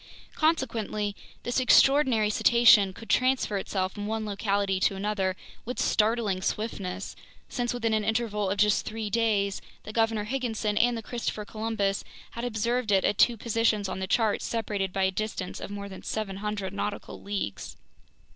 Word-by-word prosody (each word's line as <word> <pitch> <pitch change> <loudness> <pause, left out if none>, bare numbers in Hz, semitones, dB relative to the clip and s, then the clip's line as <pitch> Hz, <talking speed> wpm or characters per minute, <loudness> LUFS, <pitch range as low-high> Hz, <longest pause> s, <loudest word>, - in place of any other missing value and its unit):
Consequently, 230 -9 0 0.3
this 245 +2 0
extraordinary 255 -4 +5
cetacean 230 -3 +6
could 225 +4 -12
transfer 255 -5 +2
itself 190 -1 -2
from 205 0 -5
one 220 0 -2
locality 200 -2 0
to 195 - +2
another 195 -1 -1 0.3
with 250 +2 -5
startling 215 -3 +1
swiftness, 195 -2 -3 0.3
since 240 -1 -1
within 230 -2 -1
an 215 -1 +1
interval 215 -3 0
of 200 - -1
just 210 0 +3
three 220 -1 -4
days, 205 -3 +1 0.2
the 215 - -8
Governor 225 -2 +1
Higginson 220 -3 -2
and 240 +2 +3
the 225 - -6
Christopher 220 -2 -4
Columbus 215 -2 -1 0.3
had 235 - -6
observed 235 0 -1
it 195 -1 +4
at 205 - 0
two 240 -2 +5
positions 225 -2 +1
on 190 - -4
the 190 - -3
charts 215 +1 +1
separated 205 -4 -2
by 190 +1 0
a 190 - +3
distance 200 -2 -4
of - - -6
more 200 0 -6
than 190 -1 -9
700 205 -2 -3
nautical 205 0 -4
leagues. 200 - -4
210 Hz, 160 wpm, -27 LUFS, 200-230 Hz, 0.3 s, cetacean